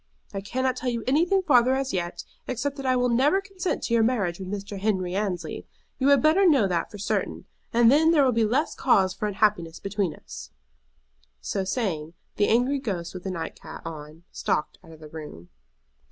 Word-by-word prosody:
I 195 - -3
cannot 260 +5 -1
tell 255 0 -2
you 235 -2 -2
anything 345 +8 +2
farther 255 -5 +4
as 270 0 -2
yet, 175 -1 -3 0.2
except 265 +3 -2
that 270 -1 -4
I 255 - +3
will 250 0 +2
never 265 +10 +3
consent 385 -2 -4
to 235 - -1
your 230 - +4
marriage 210 -7 0
with 190 -1 -6
Mr. 200 0 -5
Henry 190 -3 0
Annesley. 195 -4 -3 0.3
You 265 - +2
had 280 -3 +5
better 320 +6 +5
know 285 - +5
that 175 -3 -1
for 205 - -10
certain, 200 - -2 0.3
and 235 0 +5
then 315 +3 +5
there 305 -4 +5
will 255 - +3
be 230 -1 +2
less 260 +9 +1
cause 190 -7 +3
for 210 - -3
unhappiness 190 -5 0
between 195 -5 -2
us." - - -10 0.9
So 195 - -2
saying, 175 -7 -2 0.2
the 205 - +3
angry 250 +5 +2
ghost 180 -9 -4
with 185 0 -9
the - - -2
night 170 -3 -4
cap - - -10
on 155 0 -8
stalked 150 - -2
out 165 - -14
of 160 -1 -14
the 155 - -9
room. 150 - -10
215 Hz, 200 wpm, -25 LUFS, 180-260 Hz, 0.9 s, had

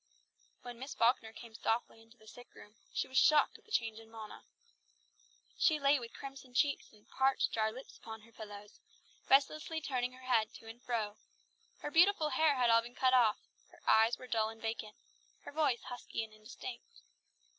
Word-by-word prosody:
When 245 -1 -8
Miss 265 +3 -6
Falkner 230 -1 +2
came 225 0 -12
softly 225 0 -2
into 225 +2 -20
the 215 - -20
sick 245 +3 -14
room, 210 - -14 0.2
she - - -1
was 260 0 +3
shocked 305 -1 +4
at - - -28
the 440 - -21
change 225 - 0
in 225 0 -15
Mona. 220 -1 -10 1.1
She 310 -2 +4
lay 280 0 +4
with 235 -2 -8
crimson 270 -2 -10
cheeks 285 +2 +1
and 210 -1 -22
parched, 265 0 +1
dry 220 -1 +1
lips 255 +5 -11
upon 220 -1 -9
her 230 +2 -19
pillows, 205 -2 -10 0.5
restlessly 310 +4 +3
turning 255 -5 -2
her 255 0 -14
head 225 -4 +2
to 225 - -12
and 230 +2 -10
fro; 220 -4 -2 0.6
her 295 - -4
beautiful 335 -2 +5
hair 315 -2 +3
had 245 -2 +3
all 230 0 +6
been 240 +1 -11
cut 260 -1 +3
off; 230 -4 +5 0.3
her - - -20
eyes 220 +2 +5
were - - -10
dull 220 -3 +1
and 225 0 -10
vacant; 225 -1 -4 0.5
her - - -8
voice 285 -5 +1
husky 245 -2 -5
and 220 -1 -10
indistinct. 215 - -10
240 Hz, 190 wpm, -34 LUFS, 220-270 Hz, 1.1 s, all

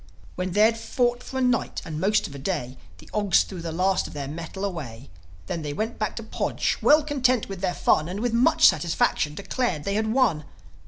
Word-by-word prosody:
When 180 0 -3
they'd 220 +3 +4
fought 245 +1 0
for 265 - -7
a - - 0
night 250 -2 0
and 155 -2 -5
the - - -3
most 210 +4 +2
of - - -7
a 140 - -8
day, 135 -5 -3 0.2
The - - -16
Ogs 205 -3 +3
threw 185 -3 -8
the 165 -1 -4
last 185 +3 +1
of - - -11
their 140 -2 -5
metal 170 +6 -5
away. 130 - -6 0.3
Then 165 - -4
they 145 -1 -4
went 220 +9 -3
back 215 -2 -2
to 230 - -5
Podge, 220 - -2
well 305 +1 +5
content 255 -5 +1
with 195 -2 -7
their 185 -2 -1
fun, 155 +2 +2
And, 190 +3 -4
with 240 0 -1
much 310 +7 +5
satisfaction, 155 -3 +1
declared 200 - -2
they 200 - -2
had 220 +1 0
won. 220 - +2
195 Hz, 220 wpm, -25 LUFS, 160-235 Hz, 0.3 s, well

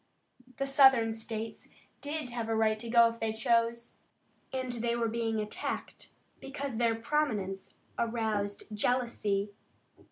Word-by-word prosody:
The 275 - 0
Southern 265 -5 +6
states 225 0 -5 0.3
did 290 -2 -3
have 235 -2 -3
a 225 - +1
right 220 -1 +2
to 235 +1 -5
go 235 0 +7
if 230 0 -9
they 220 -1 -1
chose, 230 +1 +1 0.6
and 260 -1 -2
they 235 0 0
were 235 -1 0
being 225 -1 -1
attacked 210 0 -4 0.3
because 275 -3 -5
their 230 -1 +2
prominence 225 -7 -1 0.2
aroused 220 -3 -1
jealousy. 210 -3 0
230 Hz, 130 wpm, -31 LUFS, 220-245 Hz, 0.6 s, go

